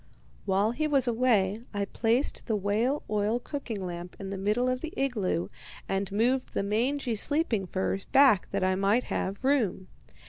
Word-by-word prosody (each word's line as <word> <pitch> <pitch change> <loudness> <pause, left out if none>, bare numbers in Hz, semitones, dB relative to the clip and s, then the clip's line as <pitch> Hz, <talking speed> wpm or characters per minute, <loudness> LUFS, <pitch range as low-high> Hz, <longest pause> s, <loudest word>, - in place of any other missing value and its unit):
"While 200 +2 +2
he 305 +6 -1
was 275 -4 +3
away 225 -4 +2
I 200 0 0
placed 235 +7 0
the 220 - +1
whale 215 +8 0
oil 210 +2 0
cooking 240 -7 -5
lamp 175 0 -6
in 195 0 -6
the 195 - -4
middle 210 +6 +1
of 255 0 -1
the 320 - -5
igloo, 210 -10 -1 0.4
and 195 0 -1
moved 245 +6 0
the - - +1
mangy 240 +5 0
sleeping 225 - 0
furs 190 +1 -1
back 265 -9 +4
that 200 -1 -1
I 185 0 +2
might 200 +6 +2
have 195 +6 -3
room. 235 -9 +1
215 Hz, 170 wpm, -28 LUFS, 195-255 Hz, 0.4 s, back